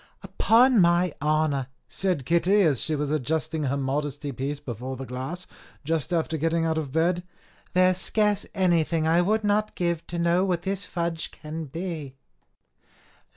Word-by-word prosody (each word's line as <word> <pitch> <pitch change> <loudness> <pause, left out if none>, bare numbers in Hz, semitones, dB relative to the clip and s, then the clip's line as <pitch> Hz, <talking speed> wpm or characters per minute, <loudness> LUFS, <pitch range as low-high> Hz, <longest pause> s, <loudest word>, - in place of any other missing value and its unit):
"Upon 240 +1 +4
my 175 -1 +3
honour," 150 -3 +1 0.2
said 180 -9 -1
Kitty, 180 +6 +3
as 150 -7 +2
she 155 - 0
was 145 0 -2
adjusting 155 +2 -1
her 140 +1 0
modesty 140 +1 -2
piece 140 +3 -4
before 130 -1 -6
the 135 - -6
glass, 130 +9 -5 0.4
just 160 +1 -1
after 160 -2 0
getting 165 +2 +1
out 160 -1 +1
of 145 -4 -5
bed, 170 +4 +1 0.5
"there 185 0 +5
is 180 - -2
scarce 210 0 +1
anything 170 -4 +2
I 165 +2 +4
would 215 +4 +1
not 210 +1 +1
give 170 -2 -1
to 175 - -5
know 170 +2 +2
what 180 -3 0
this 195 +1 -2
fudge 170 -2 -3
can 155 +1 -7
be." 155 -3 -6
165 Hz, 160 wpm, -26 LUFS, 145-180 Hz, 0.5 s, there